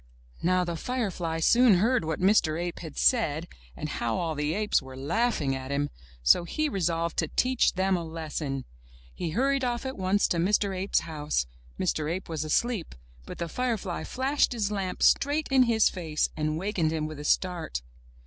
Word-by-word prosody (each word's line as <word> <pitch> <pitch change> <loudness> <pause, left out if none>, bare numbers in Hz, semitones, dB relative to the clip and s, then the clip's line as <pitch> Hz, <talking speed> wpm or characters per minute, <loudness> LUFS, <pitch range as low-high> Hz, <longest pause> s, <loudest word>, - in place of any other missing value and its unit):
Now 180 +1 +2
the 170 -1 -3
firefly 180 -7 -2
soon 235 +3 +6
heard 230 +6 +2
what 160 -1 -2
Mr. 180 -5 +3
Ape 175 0 -4
had 160 -4 -9
said, 170 - +2 0.3
and - - -4
how 115 -1 -2
all 165 -2 -1
the 150 +2 -1
apes 210 -5 +2
were 130 -1 -10
laughing 155 - 0
at 130 0 -6
him, 145 +1 -1 0.3
so - - +5
he 310 - -1
resolved 170 - -1
to 160 - +1
teach 255 +9 +2
them 190 +1 +1
a 175 - -2
lesson. 155 -4 -4 0.5
He 170 - -3
hurried 270 - +1
off 240 0 -1
at 265 -5 -5
once 190 +2 +2
to 175 - +1
Mr. 195 +2 +1
Ape's 190 +2 +1
house. 150 - -2 0.3
Mr. 155 0 0
Ape 185 +1 -4
was 160 -2 -2
asleep, 200 +4 -1 0.3
but - - -7
the 170 - -3
firefly 220 -3 -2
flashed 270 +1 +1
his 210 -3 -1
lamp 195 -3 -2
straight 290 +2 +3
in 265 -1 +5
his 220 -2 +4
face 160 -5 -1
and 155 0 -1
wakened 180 -3 0
him 155 -1 -1
with 155 -1 -6
a - - -6
start. 165 - 0
175 Hz, 185 wpm, -27 LUFS, 155-220 Hz, 0.5 s, soon